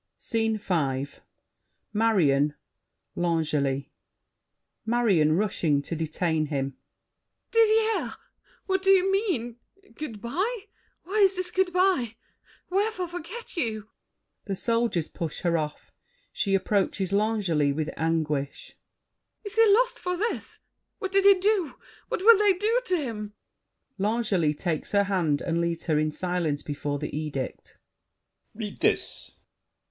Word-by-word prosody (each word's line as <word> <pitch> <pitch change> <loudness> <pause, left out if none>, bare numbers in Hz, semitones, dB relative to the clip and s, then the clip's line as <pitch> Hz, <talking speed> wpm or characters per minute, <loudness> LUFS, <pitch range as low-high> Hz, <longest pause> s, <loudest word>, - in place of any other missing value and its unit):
SCENE 225 -1 -1
V 140 -9 -1 0.9
Marion, 155 -10 +3 0.6
L'Angely 150 -5 0 0.9
MARION 215 -10 +3
(rushing 175 -8 +1
to 165 - -4
detain 160 0 -1
him). 135 -2 -2 0.8
Didier! 445 -1 +3 0.5
What 380 -1 0
do 385 - +1
you 385 0 +5
mean? 325 - -1 0.4
Good 255 -9 -6
by? 385 - -2 0.4
Why 395 +3 +4
this 365 -1 -2
good 375 -1 +1
by? 360 - +2 0.6
Wherefore 390 -2 0
forget 355 +8 -8
you? 220 - -2 0.6
[The 195 - -2
Soldiers 230 -6 0
push 165 -3 -5
her 170 -2 +1
off; 150 -2 -4 0.4
she 195 -2 +1
approaches 195 -1 0
L'Angely 200 -9 +2
with 155 +2 -2
anguish. 155 -4 -2 0.7
Is 410 -2 -7
he 450 -2 +6
lost - - +3
for 360 0 -2
this? 445 +5 -3 0.4
What 385 - -4
did 390 0 +3
he 400 0 +9
do? 375 -7 +1 0.3
What 370 - -3
will 450 -1 +8
they 415 -2 +5
do 435 +6 +1
to 365 -5 +1
him? 215 -8 -5 0.7
L'ANGELY 200 -7 +1
(takes 160 +2 -3
her 200 0 +5
hand 175 -7 0
and 170 -1 0
leads 170 -1 -2
her 155 -3 +2
in 155 0 +1
silence 165 -3 -2
before 145 0 -3
the 150 0 -5
edict). 150 -4 -5 0.8
Read 210 -2 -6
this! - - 0
210 Hz, 125 wpm, -26 LUFS, -, 0.9 s, he